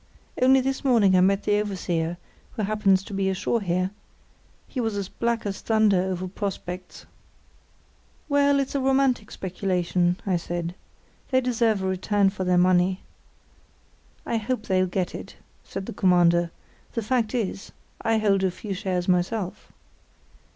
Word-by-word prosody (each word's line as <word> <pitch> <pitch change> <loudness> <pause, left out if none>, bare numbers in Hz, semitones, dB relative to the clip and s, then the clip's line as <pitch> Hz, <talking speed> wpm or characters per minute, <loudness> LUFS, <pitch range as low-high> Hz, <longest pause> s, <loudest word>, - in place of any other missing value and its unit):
Only 265 +1 +6
this 265 +1 -2
morning 225 -8 +4
I 180 - +5
met 195 +2 +3
the 205 0 +2
overseer, 175 -4 -2 0.4
who 215 - -3
happens 195 -2 +2
to 200 - -9
be 195 0 0
ashore 205 +4 0
here. 185 0 0 0.8
He 255 - -3
was 225 -3 -1
as 200 -2 -3
black 235 -1 -1
as 195 -2 -4
thunder 215 -4 +3
over 185 0 -2
prospects." 185 -2 -6 1.2
"Well, 285 -1 +3
it's 275 - -2
a 280 - 0
romantic 265 -4 +2
speculation," 180 -1 -1
I 190 -3 +1
said. 175 0 -4 0.6
"They 260 - +3
deserve 230 -5 +1
a - - 0
return 195 +1 +1
for 190 -1 -4
their 180 -1 +2
money." 180 +1 +3 1.2
"I 230 - 0
hope 225 +1 -2
they'll 185 -2 +2
get 180 0 -2
it," - - -8 0.3
said 195 - -6
the - - -6
Commander. 175 -2 +3 0.4
"The 230 - -2
fact 240 +1 0
is, 205 -4 -3 0.3
I 225 0 +2
hold 200 -3 +2
a 190 - +3
few 195 +3 -6
shares 185 -2 -2
myself." 185 +2 -1
195 Hz, 150 wpm, -25 LUFS, 185-225 Hz, 1.2 s, Only